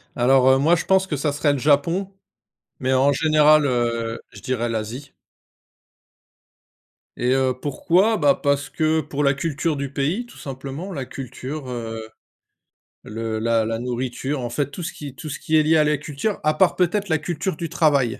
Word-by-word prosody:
Alors, 130 +1 +4
heu, 130 - +6
moi 160 +5 +4
je 170 - -3
pense 190 0 +3
que 150 - -2
ça 145 +1 0
serait 145 0 +1
le 140 - -2
Japon, 165 +8 +1 0.7
mais 130 0 +1
en 135 +2 +4
général, 155 0 +4
heu, 115 -2 -1
je - - -12
dirais 125 -3 -1
l'Asie. 115 +5 -5 2.0
Et 125 +1 +1
heu, 130 -1 +2
pourquoi? 175 - +2
Ben 145 -5 +4
parce 140 0 0
que 160 0 +1
pour 145 -2 -3
la 140 0 +4
culture 155 +1 -2
du 140 0 -3
pays, 160 - -1
tout 240 - -16
simplement, 135 +7 -7
la 140 -7 -4
culture, 130 +2 -7
heu, 115 -2 -5 1.0
le 110 0 -4
la 115 0 +2
la 115 +1 -2
nourriture 125 +3 -3
en 120 - -3
fait, 140 +3 -2
tout 170 - -7
ce 170 - -3
qui 145 -5 -9
tout 155 +1 -8
ce 140 - -5
qui 160 - -1
est 155 - +5
lié 160 +1 +4
à 150 - +4
la 150 0 +2
culture. 150 +8 -3
À 155 - +3
part, 175 +4 +3
peut-être, 195 +3 +1
la 160 -3 +2
culture 170 +2 -3
du 165 +1 -5
travail, 145 -7 +2
140 Hz, 190 wpm, -22 LUFS, 125-155 Hz, 2.0 s, heu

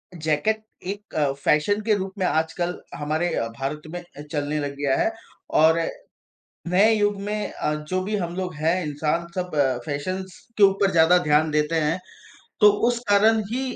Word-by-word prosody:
jacket 160 +8 0 0.2
एक 205 +3 -7
अ, 145 -3 +2
fashion 150 +9 +1
के 215 0 +2
रूप 190 -1 -4
में 185 - +1
आजकल 175 +2 -1 0.2
हमारे 155 +4 -1
अ, 115 - -1
भारत 145 +3 -3
में 175 - -4
अ, 175 -4 -13
चलने 150 0 -1
लग 140 -1 -4
गया 140 -2 +1
है - - +1 0.5
और 160 +1 +5 0.9
नए 200 +5 +5
युग 205 -1 +1
में 210 0 -3
अ, 150 - -2
जो 150 +5 -3
भी 210 +2 -2
हम 175 -3 -3
लोग 180 -3 -3
हैं 165 +4 0
इंसान 150 +3 -1
सब 180 -1 -3 0.4
फैशंस 185 +6 -4 0.2
के - - +3
ऊपर 195 0 +3
ज़्यादा 170 +1 +5
ध्यान 150 +1 +3
देते 150 +2 0
हैं, 155 +4 0 0.6
तो 210 0 +8 0.2
उस 240 -1 0
कारण 215 +2 +5
ही 260 +2 -1
175 Hz, 175 wpm, -24 LUFS, 150-200 Hz, 0.9 s, तो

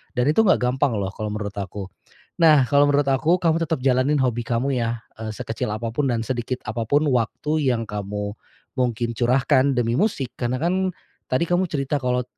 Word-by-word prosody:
Dan 125 +1 +1
itu 155 - +1
nggak 200 - +5
gampang 125 0 +1
loh, 100 -1 -2
kalo 110 +1 -5
menurut 105 -1 -4
aku. 100 -1 -5 0.5
Nah 155 -5 +6
kalo 145 +2 +4
menurut 145 0 +2
aku 155 +6 +3
kamu 165 -2 +2
tetap 160 -2 -1
jalanin 135 +2 +2
hobi 120 -2 0
kamu 125 +4 0
yah 115 -1 -1 0.4
sekecil 115 -2 -4
apapun 115 +6 -2
dan 115 -1 -1
sedikit 125 +1 -3
apapun 115 +7 +1
waktu 150 +6 0
yang 115 - -3
kamu 105 0 -4 0.5
mungkin 120 -1 0
curahkan 130 +3 +3
demi 120 -1 +1
musik, 170 - 0
karena 125 +1 -1
kan 185 +2 +1 0.4
tadi 130 +5 +2
kamu 180 +1 +1
cerita 145 -2 -1
kalo 125 -1 0
125 Hz, 175 wpm, -23 LUFS, 115-145 Hz, 0.5 s, Nah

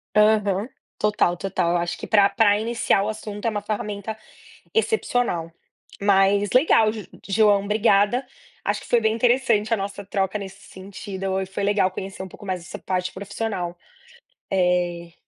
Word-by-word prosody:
Aham, 210 0 +3 0.3
total, 210 -4 +2
total! 175 -2 -1
Eu 175 - +2
acho 175 0 -2
que - - -7
pra 200 -2 +5
pra 205 0 +3
iniciar 225 -2 +1
o 210 - -2
assunto, 210 -1 -6
é - - +3
uma 210 -2 -3
ferramenta 210 0 -4 0.6
excepcional. 245 - 0 0.5
Mas, 200 0 +3
legal 250 -5 +4
Jo 215 -1 -7 0.2
João, 205 0 +3
obrigada! 210 +3 +2 0.4
Acho - - -1
que - - -13
foi 240 - +3
bem 220 0 +2
interessante 230 -2 +2
a - - +2
nossa 200 0 -5
troca, 195 0 -1
nesse 195 -1 -9
sentido. 195 0 -8 0.2
Foi 190 +1 -4
legal 200 -2 +2
conhecer 190 +1 -7
um - - -7
pouco 205 - -13
mais 185 -2 -3
essa 175 - -8
parte 185 -1 -2
profissional. 190 -3 -4 0.7
Eh, 175 -2 0
200 Hz, 155 wpm, -23 LUFS, 190-215 Hz, 0.7 s, pra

